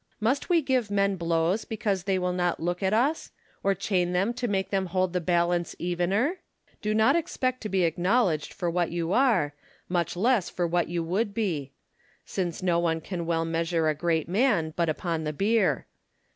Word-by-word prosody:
Must 250 - 0
we 340 -3 +3
give 255 -5 +1
men 200 -1 +2
blows 170 +3 0
because 205 -4 -2
they 195 -1 +1
will 180 -1 -1
not 175 -1 0
look 175 +2 -2
a<. 190 - +2
us? 245 +10 +1 0.3
or 195 0 +2
chain 180 -2 0
them 195 +6 +1
to 240 0 -2
make 195 -3 -1
them 195 -1 0
hold 185 0 0
the 180 - 0
balance 175 0 +1
evener? 190 - 0 0.4
Do 215 0 0
not 220 +6 +4
expect 255 -6 -1
to 215 - -4
be 190 -2 +1
acknowledged 175 -1 +1
for 180 -3 -4
what 170 0 0
you 170 +1 -2
are, 220 - +3 0.3
much 175 -2 -1
less 220 +1 +2
for 175 - -1
what 170 0 +1
you 170 0 -2
would 200 +5 -1
be; 155 - -2 0.5
since 180 -2 -3
no 175 -2 +2
one 165 -1 +1
can 170 0 -5
well 165 -1 +1
measure 165 -1 0
a - - +2
great 160 +1 0
man 190 -5 +1
but 170 -2 +1
upon 165 +1 -2
the 150 0 -2
bier. 215 +7 +1
180 Hz, 190 wpm, -27 LUFS, 170-210 Hz, 0.5 s, not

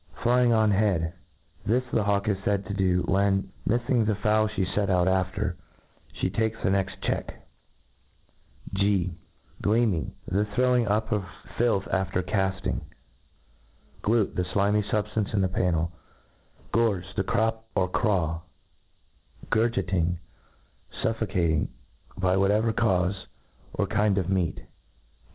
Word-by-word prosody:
^ - - -12
Flying 120 0 +4
on 110 -2 +4
head; 95 -5 +1 0.5
this 120 +4 +2
the 110 - +3
hawk 100 0 +1
is 105 - +2
faid 100 0 0
to 100 - -4
do, 90 -2 +2
when, 95 +2 +1 0.2
mifSng 120 -1 +2
the 110 - +2
fowl 110 +1 +2
ihe 100 -3 -1
fet 100 -2 +1
out 90 -1 +3
after, 95 -1 0 0.6
fhe - - -1
takes 110 0 0
the 95 - +2
next 95 -1 -1
check - - -3 1.3
G 95 -2 +1 0.5
deeming; 100 -4 +1
the 100 +3 +1
throwing 125 -2 +3
up 110 +2 0
of 105 -3 +1 0.3
filth 115 -5 +1
after 95 -1 0
caft 95 -1 -1
ing - - -1 1.2
Glute 110 -1 +1
J - - +1
the 90 +2 -3
(limy 105 +1 +3
fubftance 105 0 -1
in 100 - +3
the 95 - +3
pannci 85 -2 0 0.8
Gorge; 100 -6 +1
the 95 - 0
crop 110 +3 0
or 90 - +2
craw 90 -5 0 1.1
Gurgiting, 95 -6 +1 0.9
fuffocating, 95 -8 +1 0.5
by 95 0 +2
whatever 105 +4 +3
caufe, 95 -4 +1 0.5
or - - +1
kind 105 -1 +1
of 95 -2 0
meat. 90 -4 0
100 Hz, 135 wpm, -27 LUFS, 95-110 Hz, 1.3 s, Flying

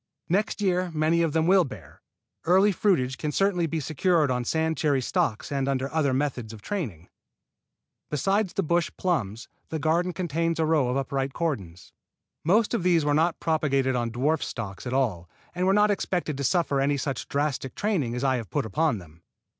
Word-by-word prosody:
Next 205 +4 0
year 185 -2 +1
many 155 +2 +2
of 165 -2 +1
them 160 0 +2
will 185 +1 +5
bear. 135 - -10 0.4
Earlier 190 +4 +4
fruitage 130 -11 +1
can 150 - -2
certainly 180 -1 +1
be 160 +1 -2
secured 155 0 +1
on 125 -1 0
sand 160 +5 0
cherry 145 -4 +1
stocks 115 -2 -1
and 135 -1 -1
under 135 +1 -1
other 155 -4 +2
methods 130 -4 -2
of 105 -2 -12
training. 115 - -4 1.0
Besides 195 +6 0
the 195 - 0
bush 170 +1 +1
plums, 120 - -1 0.2
the 160 - -2
garden 165 +4 +1
contains 165 -2 -1
a 160 - +3
row 155 -5 +2
of 125 +2 0
upright 135 0 -2
cordons. 100 - -4 0.5
Most 210 +8 +3
of 235 - +1
these 170 -3 +3
were 145 - +2
not 165 +3 +2
propagated 140 -5 +1
on 120 -1 -1
dwarf 140 +8 0
stocks 105 0 -5
at 120 - -3
all, 105 -11 0 0.2
and 180 +1 0
were - - +5
not 210 +1 +4
expected 180 -6 -1
to 140 - -3
suffer 140 -1 +1
any 140 +1 +1
such 135 0 -3
drastic 140 -2 -2
training 165 - -1
as 125 - -3
I 130 -2 +2
have 115 -6 -6
put - - -1
upon 145 +4 +1
them. 85 -3 -14
150 Hz, 190 wpm, -26 LUFS, 130-175 Hz, 1.0 s, will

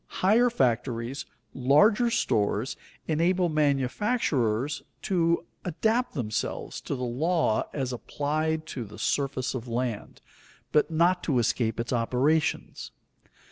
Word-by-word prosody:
Higher 225 +6 +5
factories, 125 - -1 0.3
larger 205 - +4
stores, 110 - 0 0.3
enable 175 +3 +2
manufacturers 140 - 0 0.2
to 170 -2 +1 0.2
adapt 220 +8 0
themselves 110 -6 -3
to - - -3
the 125 - -4
law 140 +1 0
as 130 -3 -3
applied 155 +5 -2
to 130 -6 -5
the 105 0 -11
surface 135 -2 -1
of 125 -2 -5
land, 120 -2 -3 0.5
but 150 - +3
not 170 +3 +2
to 140 -6 +1
escape 115 -1 0
its 120 +2 -2
operations. 130 +7 0
140 Hz, 110 wpm, -27 LUFS, 125-170 Hz, 0.5 s, Higher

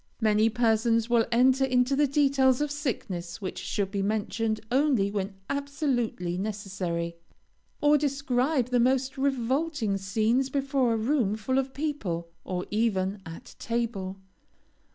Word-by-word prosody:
Many 215 -1 +3
persons 230 0 +2
will 230 -2 +4
enter 260 +3 +4
into 255 0 +2
the 295 +1 +3
details 270 -2 +3
of 295 -1 -1
sicknesses 195 - -4
which 190 -3 -5
should 195 -2 -2
be 200 -1 -1
mentioned 215 +2 -1
only 255 -7 +2
when 200 -1 -3
absolutely 260 - -2
necessary, 185 -5 -3 0.6
or 295 0 +5
describe 270 -1 0
the 250 -1 +2
most 260 +2 +2
revolting 270 -3 0
scenes 220 +7 +1
before 270 -3 +1
a - - 0
room 225 -3 +1
full 260 +5 0
of 265 0 -2
people, 210 - -3
or 180 -1 -3
even 205 -3 0
at 165 - -10
table. 220 -5 -2
235 Hz, 135 wpm, -27 LUFS, 200-270 Hz, 0.6 s, or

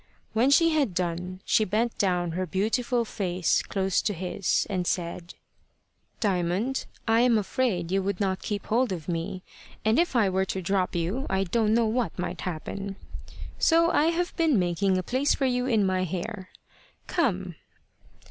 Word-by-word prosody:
When 235 +4 +3
she 330 +4 +5
had 285 - +1
done, 180 +1 -3
she 220 - +3
bent 220 +4 0
down 180 -3 +1
her 185 +2 -2
beautiful 230 +6 0
face 180 -4 0
close 190 -1 0
to 205 - -1
his, 185 +2 0
and 185 -4 -2
said 170 0 -3 0.8
"Diamond, 195 +6 0 0.2
I 225 0 +4
am 240 -2 +4
afraid 195 -4 -1
you 195 0 +2
would 195 -1 -2
not 190 -2 0
keep 205 -2 -4
hold 240 0 +1
of 170 -4 -5
me, 175 +2 -3 0.4
and 220 +7 +3
if 345 -5 +1
I 225 -4 +4
were 190 0 +1
to 190 - -3
drop 185 0 0
you, 185 +11 -1
I 195 0 +1
don't 215 +3 +1
know 235 -1 +3
what 220 -4 -1
might 180 - -4
happen; 195 +3 -5 0.6
so 335 +1 +4
I 300 - +3
have 340 +2 0
been 325 -7 +3
making 185 +1 +1
a 185 - -1
place 260 +8 +1
for 275 - 0
you 250 0 0
in 220 -5 +3
my 185 -1 +1
hair. 185 +2 -5 0.6
Come." 190 - 0
195 Hz, 170 wpm, -27 LUFS, 180-235 Hz, 0.8 s, she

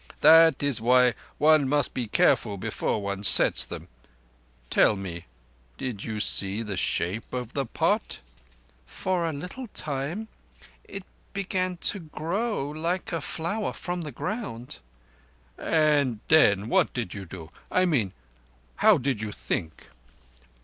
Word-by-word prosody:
That 160 -2 +7
is 140 -5 +1
why 125 +1 +4 0.2
one 150 -3 +4
must 145 -1 +1
be 125 -3 -3
careful 105 0 +2
before 100 +2 -2
one 100 0 -4
sets 100 - +7
them. - - -8 0.8
Tell 110 - +4
me, 90 -3 -7 0.5
did 115 -6 -5
you 110 -2 -4
see 100 +1 +2
the 105 -3 -5
shape 95 +4 -1
of 125 -1 -5
the 135 -3 -2
pot?" - - -1 0.7
"For 180 -3 -2
a - - -2
little 180 - -7
time. 155 +5 -4 0.6
It 195 -1 -7 0.3
began 185 -2 -1 0.2
to 205 - -7
grow 170 +3 -3
like 170 +4 -2
a 165 -2 -2
flower 175 +9 -3
from 175 0 -4
the 150 -3 -6
ground." 155 - -5 0.8
"And 145 - +1
then 105 -10 +5
what - - +1
did 115 -8 -3
you 100 -2 -7
do? 85 -2 -10 0.2
I 185 0 +2
mean, 125 - +1 0.7
how - - +5
did 125 -4 -2
you 110 -1 -4
think?" 80 +3 -5
140 Hz, 135 wpm, -26 LUFS, 105-170 Hz, 0.8 s, That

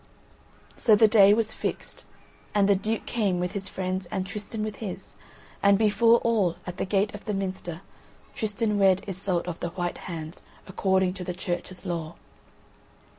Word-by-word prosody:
So 220 -3 +5
the 220 +1 +6
day 205 -2 +7
was 220 0 +2
fixed, - - -5 0.5
and 200 -1 +4
the 200 - +6
Duke 215 +3 -2
came 200 -6 0
with 180 0 -1
his 195 -1 -3
friends 185 -1 -3
and 185 - -3
Tristan 210 +2 -5
with 215 -1 -4
his, 200 -5 -7 0.5
and 200 0 +5
before 225 +2 +5
all, 210 -7 +2
at 180 0 -6
the - - -1
gate 200 +2 +1
of 205 - -9
the 210 - -2
minster, 185 -3 -4 0.5
Tristan 210 -1 -1
wed 190 -1 +4
Iseult 185 -2 -1
of 175 -2 -5
the 170 - -3
White 175 0 -3
Hands, 160 -1 -6 0.2
according 190 -1 +1
to 185 -1 -6
the 180 -1 -4
Church's 180 +1 -4
law. 170 -2 -4
195 Hz, 170 wpm, -26 LUFS, 180-210 Hz, 0.5 s, day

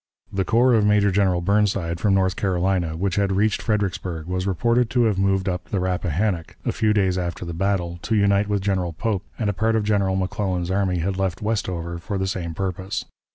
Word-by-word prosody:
The 95 -1 +1
corps 120 +6 +3
of 110 -2 +4
Major 105 -1 +4
General 95 -2 +2
Burnside, 95 -3 +1
from 100 +2 +2
North 95 0 +2
Carolina, 90 -4 0
which 95 +1 -1
had 100 -1 +2
reached 105 +2 +1
Fredericksburg, 95 -6 -2
was 90 +2 -2
reported 115 +5 +2
to 125 0 +2
have 105 -4 +1
moved 95 -1 +1
up 90 -1 -2
the 100 - -2
Rappahannock, 90 -1 -1
a - - +1
few 110 -1 +1
days 95 -3 +2
after 90 0 -4
the 85 - -5
battle, 90 -1 -1
to 110 - -1
unite 100 0 +3
with 100 -2 -1
General 95 -4 0
Pope, 100 +3 -2
and 110 - -1
a 100 - +1
part 110 +3 +1
of 110 - +1
General 100 -2 +1
McClellan's 95 -1 -1
army 95 -2 +1
had 95 +3 -1
left 95 0 -2
Westover 90 -6 -2
for 100 +3 -4
the 95 - -1
same 85 -4 -3
purpose. 95 +1 -3
95 Hz, 205 wpm, -23 LUFS, 90-105 Hz, -, of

